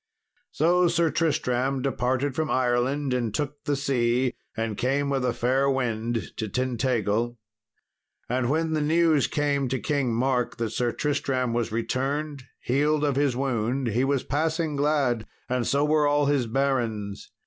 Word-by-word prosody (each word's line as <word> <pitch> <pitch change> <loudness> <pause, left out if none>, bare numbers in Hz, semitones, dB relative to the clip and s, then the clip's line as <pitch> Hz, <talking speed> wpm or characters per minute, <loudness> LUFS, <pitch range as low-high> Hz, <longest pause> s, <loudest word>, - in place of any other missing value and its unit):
So 175 +3 +3
Sir 170 -1 +2
Tristram 135 -4 0
departed 130 +1 0
from 155 +2 -1
Ireland 130 +2 +1
and 120 -3 -1
took 145 -1 -3
the 145 - +1
sea 125 -2 +1 0.2
and 115 -1 -2
came 140 +4 0
with 135 -2 0
a 125 - +2
fair 130 +4 +1
wind 120 -3 -2
to 110 -2 -3
Tintagil. 120 -2 0 0.9
And 125 0 0
when 160 +2 0
the 155 - +1
news 160 -1 +3
came 145 -2 0
to 130 +1 -1
King 140 -3 0
Mark 125 0 0
that 115 -2 -2
Sir 120 +1 0
Tristram 130 -4 -1
was 115 -1 -1
returned, 135 +4 -2 0.2
healed 150 +4 +1
of 145 -2 +1
his 140 -3 +1
wound, 125 -1 -1
he 120 +4 +1
was 135 -1 +1
passing 160 +1 -1
glad, 140 -6 +1 0.2
and 125 -1 -1
so 140 +1 +2
were 150 0 +3
all 145 0 +2
his 140 -4 +1
barons. 115 -6 -1
135 Hz, 155 wpm, -26 LUFS, 120-145 Hz, 0.9 s, So